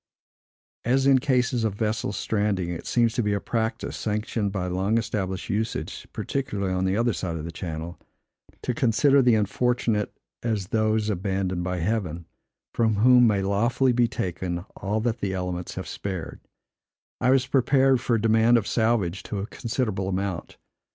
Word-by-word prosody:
As 130 +3 +2
in 135 -1 +6
cases 125 -3 +1
of 110 -3 0
vessels 110 0 -1
stranding, 100 -5 0
it 85 -2 -5
seems 120 -2 +2
to 120 - 0
be 105 -2 0
a 100 - 0
practice, 115 +1 -2
sanctioned 105 -1 -2
by 95 -2 -2
long 95 +5 0
established 100 -5 -2
usage 110 +2 -3
(particularly 105 -9 -2
on 95 0 0
the 95 +2 +1
other 120 0 +2
side 85 -4 -3
of 80 - -5
the 85 - -5
channel), 85 -1 -6 0.6
to 125 - -1
consider 135 +4 +4
the 125 -3 +4
unfortunate 110 0 0 0.3
as 105 -5 -2
those 110 -1 +1
abandoned 95 -1 -1
by 90 0 -2
Heaven, 90 -3 -2 0.5
from 110 -2 +2
whom 125 +3 +6
may 100 -3 +2
lawfully 120 +6 +2
be 120 0 +3
taken 90 -4 -3
all 105 +2 -2
that 115 0 -1
the 95 -1 -2
elements 90 -1 -4
have - - -5
spared, 95 -6 -5 0.8
I 125 - +2
was 130 -1 +4
prepared 135 0 +3
for 120 - +1
a 110 - 0
demand 115 +2 +4
of 110 - -1
salvage 110 -7 +1
to 105 - -3
a 100 - -2
considerable 110 -5 -2
amount. 95 -2 -3
110 Hz, 165 wpm, -25 LUFS, 95-120 Hz, 0.8 s, in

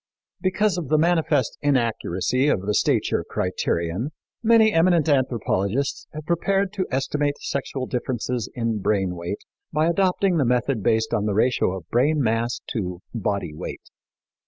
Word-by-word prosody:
Because 190 -1 +1
of 160 - -5
the 155 - +4
manifest 160 -4 +1
inaccuracy 125 -2 +1
of 100 - +2
the 105 - 0
stature - - +1
criterion, 85 - -2 0.3
many 225 -1 +5
eminent 165 -1 +3
anthropologists 130 -3 0
have 155 0 -8
prepared 195 +4 +1
to 190 -3 -2
estimate 145 +2 -1
sexual 135 -1 -3
differences 125 -2 -2
in 115 -3 -1
brain 95 -3 0
weight 85 +4 -5 0.3
by 155 +1 +2
adopting 185 +1 +2
the 145 - +3
method 125 0 +1
based 110 +1 +1
on 105 -2 +1
the 100 - 0
ratio 110 -4 +2
of 85 - -11
brain 145 +6 +3
mass 115 -1 0
to 90 -5 -4
body 100 -7 -2
weight. 75 - -8
130 Hz, 145 wpm, -23 LUFS, 110-160 Hz, 0.3 s, many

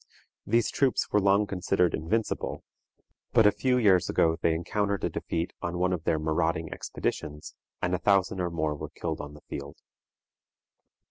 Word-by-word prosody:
These 115 +2 +2
troops 135 -3 +1
were 105 - +3
long 100 +1 +4
considered 90 -2 +1
invincible, 105 +8 -2 0.7
but 115 -3 +6
a 105 - +7
few 125 +3 +1
years 95 -7 +4
ago 80 0 +3
they 80 -1 +2
encountered 100 +4 -1
a - - 0
defeat 85 +2 -3
on 85 0 -3
one 90 +1 +1
of 80 -3 -4
their 80 - +2
marauding 80 +1 0
expeditions, 75 0 -4 0.3
and 90 - +1
a 90 - +1
thousand 95 0 +2
or 90 - 0
more 80 -2 -1
were 75 - -6
killed - - -4
on 75 0 -9
the 75 - -14
field. 70 0 -7
90 Hz, 165 wpm, -28 LUFS, 80-100 Hz, 0.7 s, a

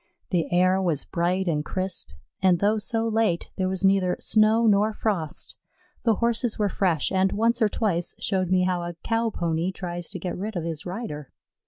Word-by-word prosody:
The 175 -4 0
air 185 +2 +3
was 165 -6 0
bright 180 +2 0
and 150 -3 0
crisp, 185 +3 -3 0.3
and 185 -2 +4
though 210 +4 +2
so 225 +2 0
late, 220 -6 0
there 185 -1 0
was 190 0 0
neither 190 -2 +3
snow 220 +1 +3
nor 210 0 +3
frost. 190 -9 -3 0.5
The 225 -2 +4
Horses 235 +1 0
were 210 -1 +1
fresh, 175 -7 0
and 190 0 +2
once 230 +3 +1
or 215 - +4
twice 180 -6 -1
showed 185 -3 0
me 185 0 +3
how 180 -1 0
a 175 0 -5
Cow 230 0 +1
pony 170 -2 -1
tries 175 -3 -5
to - - -5
get 180 - -4
rid 210 +3 -5
of 175 - -2
his 165 0 -4
rider. 175 - -6
190 Hz, 190 wpm, -25 LUFS, 175-215 Hz, 0.5 s, and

